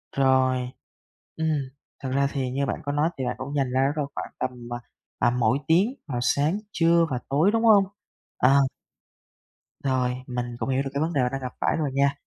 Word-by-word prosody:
Rồi, 130 Hz, -2 st, +3 dB, 0.7 s
ừm, 160 Hz, 0 st, 0 dB, 0.5 s
thực 130 Hz, -1 st, -3 dB
ra 140 Hz, +1 st, +2 dB
thì 130 Hz, -3 st, -2 dB
như 140 Hz, +2 st, -1 dB
bạn 130 Hz, -, -3 dB
có 145 Hz, -, -2 dB
nói 150 Hz, +3 st, +2 dB
thì 130 Hz, -, -1 dB
bạn 125 Hz, 0 st, -1 dB
cũng 140 Hz, +2 st, -5 dB
dành 135 Hz, -3 st, +1 dB
ra 130 Hz, -, +2 dB
đó 140 Hz, -, +1 dB
đâu 150 Hz, -2 st, 0 dB
khoảng -, -, -5 dB
tầm, 130 Hz, -, -1 dB, 0.2 s
à, -, -, -3 dB, 0.4 s
tầm 120 Hz, +1 st, +2 dB
mỗi 115 Hz, +3 st, +3 dB
tiếng 190 Hz, +10 st, +4 dB
vào 130 Hz, -5 st, -3 dB
sáng, 145 Hz, +9 st, +2 dB
trưa 170 Hz, 0 st, +4 dB
và 125 Hz, -, -1 dB
tối, 150 Hz, +8 st, +3 dB
đúng 225 Hz, +1 st, +1 dB
hông? 210 Hz, -3 st, +7 dB, 0.5 s
À. 125 Hz, -, +5 dB, 1.4 s
Rồi, 130 Hz, -2 st, +1 dB
mình 125 Hz, -1 st, -2 dB
cũng -, -, -2 dB
hiểu 130 Hz, 0 st, +2 dB
được 135 Hz, -, -4 dB
cái 140 Hz, -, -1 dB
vấn 165 Hz, +2 st, 0 dB
đề 140 Hz, -, +2 dB
bạn 125 Hz, 0 st, +1 dB
đang 135 Hz, 0 st, -3 dB
gặp 125 Hz, -1 st, -5 dB
phải -, -, +2 dB
rồi 150 Hz, -3 st, 0 dB
nha. 140 Hz, +1 st, +3 dB
135 Hz, 215 wpm, -25 LUFS, 130-155 Hz, 1.4 s, hông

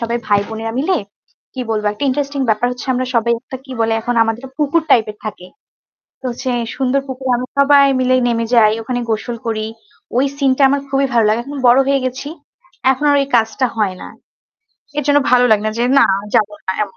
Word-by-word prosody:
সবাই 235 Hz, 0 st, -2 dB
ভাই 205 Hz, -1 st, +3 dB
বোনেরা 225 Hz, 0 st, -5 dB
মিলে 360 Hz, +7 st, +1 dB, 0.6 s
কি 260 Hz, -, -5 dB
বলব? 215 Hz, -1 st, -1 dB
একটা 210 Hz, -, -4 dB
interesting 280 Hz, +1 st, -1 dB
ব্যাপার 220 Hz, +2 st, +2 dB
হচ্ছে 250 Hz, 0 st, -7 dB
আমরা 255 Hz, +1 st, -1 dB
সবাই 235 Hz, 0 st, +2 dB
একটা 260 Hz, +1 st, -8 dB
কি 265 Hz, -, -9 dB
বলে? 225 Hz, 0 st, +1 dB
এখন 245 Hz, +2 st, -2 dB
আমাদের 225 Hz, +3 st, -2 dB
পুকুর 300 Hz, +2 st, +1 dB
type 225 Hz, -4 st, +4 dB
এর -, -, -26 dB
থাকে। 205 Hz, -4 st, -7 dB, 0.7 s
তো -, -, -25 dB
হচ্ছে 250 Hz, +2 st, -4 dB, 0.3 s
সুন্দর 270 Hz, +1 st, +1 dB
পুকুর। 265 Hz, 0 st, -6 dB
আমরা 250 Hz, +1 st, -5 dB
সবাই 280 Hz, 0 st, +6 dB, 0.2 s
মিলে 255 Hz, 0 st, +2 dB
নেমে 230 Hz, -1 st, 0 dB
যাই, 215 Hz, -2 st, +5 dB
ওখানে 245 Hz, +2 st, -3 dB
গোসল 225 Hz, +2 st, -2 dB
করি। 215 Hz, -1 st, -2 dB, 0.5 s
ওই 255 Hz, -, +3 dB
সিন 280 Hz, -2 st, +2 dB
টা 280 Hz, -, +1 dB
আমার 280 Hz, +1 st, +1 dB
খুবই 275 Hz, 0 st, +1 dB
ভালো 230 Hz, -2 st, +4 dB
লাগে। 215 Hz, +2 st, +1 dB
এখন 285 Hz, +2 st, -7 dB
বড় 245 Hz, +2 st, +6 dB
হয়ে 275 Hz, -1 st, +2 dB
গেছি। 255 Hz, +2 st, -4 dB, 0.6 s
এখন 265 Hz, +3 st, -5 dB
আর 285 Hz, -, +4 dB
ওই 275 Hz, -, 0 dB
কাজটা 225 Hz, +3 st, +1 dB
হয় 205 Hz, -4 st, 0 dB
না। -, -, -8 dB, 0.9 s
এজন্য 290 Hz, 0 st, +3 dB
ভালো 250 Hz, 0 st, +5 dB
লাগে 210 Hz, -1 st, +4 dB
না -, -, 0 dB
যে, 240 Hz, -, +1 dB
না -, -, +6 dB, 0.3 s
যাব 215 Hz, -3 st, +3 dB, 0.2 s
না 190 Hz, -, 0 dB
এমন। 200 Hz, -2 st, -7 dB
245 Hz, 210 wpm, -17 LUFS, 225-275 Hz, 0.9 s, সবাই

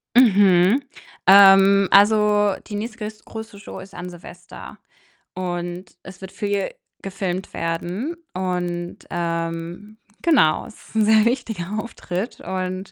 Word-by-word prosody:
Mhm. 200 Hz, -1 st, +5 dB, 0.5 s
Ähm, 195 Hz, 0 st, +7 dB
also, 210 Hz, -1 st, +4 dB
die 210 Hz, -, -6 dB
nächste 215 Hz, +2 st, -5 dB
größt 215 Hz, 0 st, -8 dB
größere 220 Hz, -2 st, -9 dB
Show 205 Hz, -, -9 dB
ist 195 Hz, +1 st, -12 dB
an 180 Hz, -1 st, -7 dB
Silvester 175 Hz, 0 st, -12 dB, 0.6 s
und 175 Hz, 0 st, -4 dB, 0.2 s
es 190 Hz, 0 st, -12 dB
wird 190 Hz, 0 st, -9 dB
viel 200 Hz, -2 st, -2 dB, 0.3 s
gefilmt 190 Hz, -1 st, -4 dB
werden 175 Hz, -, -3 dB, 0.2 s
und, 180 Hz, -1 st, -3 dB
ähm, 170 Hz, +4 st, -4 dB, 0.2 s
genau, 275 Hz, -, +3 dB
es 225 Hz, -, -14 dB
ist -, -, -19 dB
'n 220 Hz, -1 st, +3 dB
sehr 220 Hz, 0 st, +5 dB
wichtiger 225 Hz, -6 st, -2 dB
Auftritt 215 Hz, -2 st, -5 dB
und, 185 Hz, 0 st, -4 dB
195 Hz, 125 wpm, -21 LUFS, 180-210 Hz, 0.6 s, Ähm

